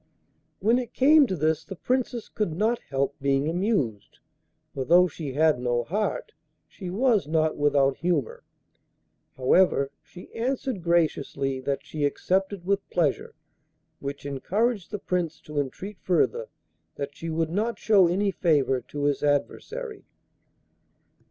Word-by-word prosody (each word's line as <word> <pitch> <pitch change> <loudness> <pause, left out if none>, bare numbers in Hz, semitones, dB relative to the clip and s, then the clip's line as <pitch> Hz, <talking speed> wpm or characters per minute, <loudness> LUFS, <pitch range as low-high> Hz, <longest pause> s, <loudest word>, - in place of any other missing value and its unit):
When 230 +5 +3
it 245 -2 -7
came 290 +1 +6
to 190 - -2
this 160 0 0
the 195 - -8
Princess 250 +2 -1
could 210 -7 -2
not 220 +7 +1
help 135 0 0
being 140 +1 +1
amused, 165 - -1 0.6
for, 135 - -2
though 175 +6 +5
she 145 -4 -6
had 155 -2 +3
no 120 -1 0
heart, 205 - -2 0.4
she 185 -3 -8
was 215 - +2
not 155 0 +1
without 140 -2 +2
humour. 165 -8 -1 0.9
However, 140 +1 +3
she 180 - -14
answered 250 -2 -2
graciously 150 -5 0
that 140 +2 -3
she 150 0 -4
accepted 190 +5 0
with 200 +1 0
pleasure, 160 -6 0 0.6
which 140 0 -6
encouraged 200 - -1
the 210 - -3
Prince 180 -4 -2
to 150 -1 -4
entreat 180 +9 -5
further 470 - +1 0.5
that 140 0 -5
she 165 - -6
would 160 0 -1
not 220 +6 -1
show 200 -5 +5
any 195 +4 +1
favour 145 -8 +2
to 145 +4 -6
his 145 -1 +1
adversary. 425 - -2
170 Hz, 140 wpm, -26 LUFS, 140-205 Hz, 0.9 s, came